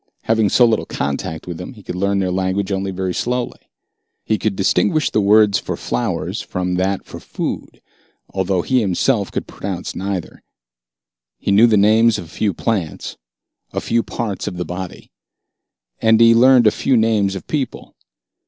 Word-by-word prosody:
Having 110 -2 +2
so 120 - +5
little 115 -2 +1
contact 75 +3 -3
with 85 -2 -6
them, 90 +9 -7
he 105 -4 -15
could - - -5
learn 100 +2 0
their 95 -2 0
language 95 +2 -1
only 95 0 -1
very 95 -1 -3
slowly. 125 +3 -2 0.7
He 110 - 0
could 110 -3 -1
distinguish 155 - +1
the 105 - +2
word 105 0 +5
for - - -2
flowers 60 - -2
from 90 0 -3
that 95 +1 -1
for - - -9
food, - - -5 0.5
although 95 -2 0
he 130 -2 +2
himself 100 +2 +1
could - - -3
pronounce - - -6
neither. 95 -3 -4 1.0
He - - -2
knew 105 +4 +6
the 110 -2 +3
names 110 +2 +4
of 90 - -6
a - - -16
few 105 +5 -1
plants, 95 -3 -3 0.6
a - - -1
few 115 0 0
parts 105 -3 -4
of 90 - -4
the 90 - -3
body. 90 +2 -7 0.9
And 110 0 +4
he 115 0 +7
learned 125 +1 +6
a 105 - +6
few 130 +3 +1
names 110 -3 +2
of 95 - -7
people. 145 -4 -4
100 Hz, 170 wpm, -19 LUFS, 95-115 Hz, 1.0 s, he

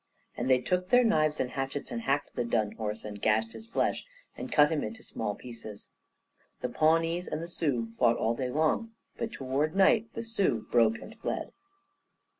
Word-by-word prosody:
And 120 +2 -2
they 130 -1 +6
took 180 +7 -1
their 250 0 +6
knives 155 -9 +2
and 125 - -1
hatchets, 135 +1 -4
and 120 -1 -3
hacked 140 +4 0
the - - -1
dun 110 -3 0
horse 110 0 -4
and 105 -1 -7
gashed 110 +1 +2
his 220 - -10
flesh, 230 - 0 0.3
and - - -7
cut 150 0 +5
him 155 - 0
into 225 -1 -6
small 105 -2 -3
pieces. 115 -4 -10 0.7
The 125 - -1
Pawnees 165 +6 +2
and 165 +2 -3
Sioux 130 -10 -1
fought 120 -1 +4
all 115 +1 +1
day 125 +1 -2
long, 160 - +1 0.2
but 230 - -3
toward 140 +3 -1
night 215 +3 +4
the 230 - -4
Sioux 195 - 0
broke 115 -2 +4
and 220 - -11
fled. - - -3
135 Hz, 185 wpm, -29 LUFS, 115-175 Hz, 0.7 s, they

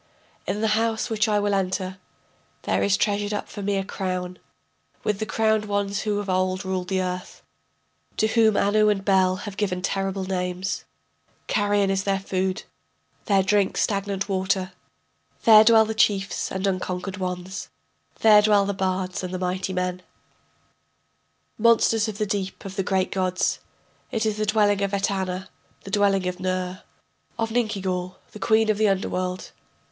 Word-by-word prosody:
In 210 - -2
the 220 - +2
house 225 +2 0
which 215 0 +2
I 210 -1 +2
will 205 0 0
enter 190 -1 -1 0.6
There - - 0
is 200 0 +3
treasured 205 0 0
up - - -4
for 205 - -8
me 200 0 0
a 195 - 0
crown, 185 -2 -4 0.6
With 210 -2 -1
the 220 - -3
crowned 220 -1 +1
ones 200 -1 -1
who 210 -1 -1
of 205 0 -3
old 185 0 0
ruled 185 -1 -2
the 190 -1 0
earth, 180 0 -6 0.7
To - - +3
whom 220 -1 +3
Anu 210 +1 +3
and 195 -2 0
Bel 190 -2 +3
have 200 -2 -7
given 180 -3 -1
terrible 195 0 -1
names, 185 +1 -3 0.6
Carrion 205 -1 +1
is 195 0 0
their 195 -1 +1
food, 190 -1 -2 0.6
their 195 -3 +3
drink 200 0 +1
stagnant 200 -1 -1
water. 190 -1 0 0.7
There 215 -1 +9
dwell 220 0 +6
the 220 - -3
chiefs 200 -2 +1
and 190 +1 -2
unconquered 185 0 -2
ones, 185 0 -5 0.5
There 210 -2 +7
dwell 205 -1 +4
the 200 - -1
bards 185 -1 -2
and 180 - -4
the 185 - -3
mighty 185 +1 -2
men, 180 0 -2 1.6
Monsters 225 -1 +4
of 215 -2 -5
the 215 - 0
deep 195 -2 -4
of 195 -1 -7
the 195 - 0
great 190 -1 0
gods. 185 -1 0 0.5
It 225 -1 -1
is 215 -1 0
the 215 0 -1
dwelling 205 -1 +3
of 200 0 0
Etana, 190 -2 -2 0.3
the 195 - -9
dwelling 200 -2 +2
of 180 0 -4
Ner, 185 0 -2 0.6
Of 225 -1 -1
Ninkigal, 190 -6 -1 0.2
the 210 - -10
queen 220 0 +3
of 210 - -3
the 215 - +4
underworld.... 185 -1 -2
195 Hz, 165 wpm, -24 LUFS, 185-210 Hz, 1.6 s, There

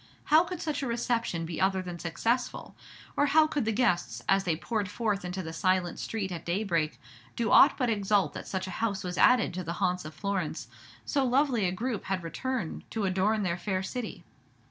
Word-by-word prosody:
How 315 +3 +5
could 360 -1 -6
such 305 -3 -2
a 270 - -2
reception 235 -7 -1
be 165 +1 -4
other 190 0 +2
than 175 -1 -6
successful; 230 +10 -2 0.4
or 290 - +3
how 315 +2 +5
could 295 -5 -1
the 225 - +1
guests, 210 -6 0
as 195 0 +3
they 170 -3 +1
poured 205 +3 -2
forth 210 -2 -1
into 180 +1 -4
the 160 0 -6
silent 185 0 +1
street 200 -4 -3
at 170 -1 -5
daybreak, 170 -4 -1 0.4
do 230 -1 0
aught - - +7
but 250 - +1
exult 205 -3 +1
that - - -7
such 190 -1 -2
a 185 - -6
house 200 -3 0
was 180 -1 -4
added 250 -7 +5
to 185 +1 -4
the 170 0 -3
haunts 180 +1 0
of 155 +1 -9
Florence, 175 - -2 0.4
so 275 - +1
lovely 255 -5 +2
a - - 0
group 225 +3 -3
had 190 -2 -2
returned 235 +2 -3
to 220 -3 -2
adorn 195 +3 +1
their 175 -2 0
fair 190 -1 -1
city? 235 +4 -5
195 Hz, 205 wpm, -29 LUFS, 180-235 Hz, 0.4 s, aught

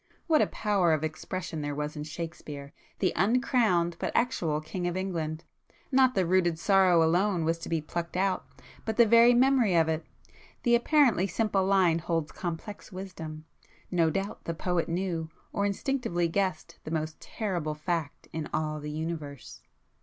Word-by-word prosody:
What 315 -2 +4
a - - +3
power 195 -6 +1
of 155 -1 0
expression 160 +1 -4
there 145 -1 -3
was 150 +1 -3
in 150 - -5
Shakespeare, 150 -3 -7 0.2
the - - +1
uncrowned 195 - +2
but - - -2
actual 170 -11 +1
King 175 +3 -4
of 175 +1 -2
England! 165 -4 -3 0.5
Not 260 -1 +4
the 190 - +2
'rooted 175 -2 +2
sorrow' 185 -2 +4
alone 175 +1 +2
was 165 +1 0
to - - -7
be 165 -2 0
'plucked 170 +3 -4
out' 190 0 +1 0.4
but 220 -1 -3
the 235 - +7
very 235 +2 +6
'memory' 250 -6 +4
of 165 -1 +4
it. 160 0 -1 0.6
The 240 - +3
apparently 240 - +4
simple 200 -2 0
line 185 -4 +4
holds 165 -2 -2
complex 180 +5 -6
wisdom; 165 -5 -7 0.5
no 170 -3 +3
doubt 195 +5 -4
the 165 - -3
poet 180 0 -1
knew, 170 -2 -2 0.2
or 200 0 +1
instinctively 200 -5 -1
guessed 185 -1 -2
the - - -7
most 155 -1 -3
terrible 175 -9 -3
fact 155 -1 -3
in 160 -1 -4
all 155 0 -1
the 150 0 -6
Universe 155 -3 -6
175 Hz, 165 wpm, -28 LUFS, 160-200 Hz, 0.6 s, the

